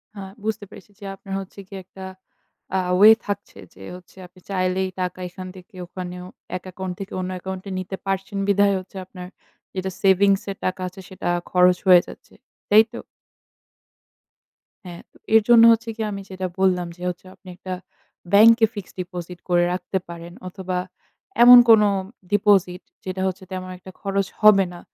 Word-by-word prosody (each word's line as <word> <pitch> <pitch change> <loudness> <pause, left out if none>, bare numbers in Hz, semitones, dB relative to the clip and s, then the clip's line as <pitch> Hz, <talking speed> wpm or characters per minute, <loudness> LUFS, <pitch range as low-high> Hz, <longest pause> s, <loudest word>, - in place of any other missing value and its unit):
হ্যাঁ, 195 -1 -8
বুঝতে 215 -1 -3
পেরেছি 205 - -15
যে 200 - -10
আপনার 195 0 -10
হচ্ছে 195 +1 -10
গিয়ে 195 0 -8
একটা 190 +1 -12 0.7
আ - - +2 0.2
ওয়ে 210 +3 +9 0.2
থাকছে 205 0 -5 0.2
যে - - -17
হচ্ছে 180 -1 -16
যে - - -11
আপনি 180 +1 -22
চাইলেই 185 0 -1
টাকা 180 0 -3
এখান 185 +1 -9
থেকে 185 +3 -15
ওখানেও 180 0 -7 0.3
এক 180 - -15
অ্যাকাউন্ট 185 0 -6
থেকে 195 - -7
অন্য 185 0 -4
অ্যাকাউন্টে 190 +1 -7
নিতে 185 +1 -5
পারছেন 195 +1 -3
বিধায়, 200 0 +3
হচ্ছে 185 +1 -12
আপনার 180 -1 -10 0.5
যেটা 190 0 -3
সেভিংসের 195 0 +2
টাকা 185 +1 -2
আছে, 190 +2 -11
সেটা 190 - -6 0.2
খরচ 180 0 +4
হয়ে 180 -1 +8
যাচ্ছে। - - -14 0.4
তাই 215 +1 +8
তো? - - -6 1.8
হ্যাঁ, 175 -1 -9
তো - - -22 0.2
এর 225 - +7
জন্য 235 -1 +8
হচ্ছে 230 +1 0
কি? 225 - -6
আমি 200 -1 -5
যেটা 185 -1 -4
বললাম, 180 -2 +2
যে 175 - -10
হচ্ছে 180 +1 -8
আপনি 190 - -23
একটা 185 0 -7 0.6
ব্যাংকে 225 +3 +7
ফিক্সড 205 -5 -9
ডিপোজিট 180 -1 -8
করে 175 0 +3
রাখতে 185 +1 -3
পারেন 170 0 -9
অথবা, 185 0 -5 0.7
এমন 245 +1 +11
কোন 220 -2 +8 0.5
ডিপোজিট, 195 -3 +2 0.2
যেটা 185 0 -4
হচ্ছে 190 +1 -5
তেমন 185 0 -5
একটা 185 +1 -13
খরচ 195 -1 -1
হবে 210 -3 +6
না। 175 - -10
190 Hz, 170 wpm, -22 LUFS, 180-200 Hz, 1.8 s, এমন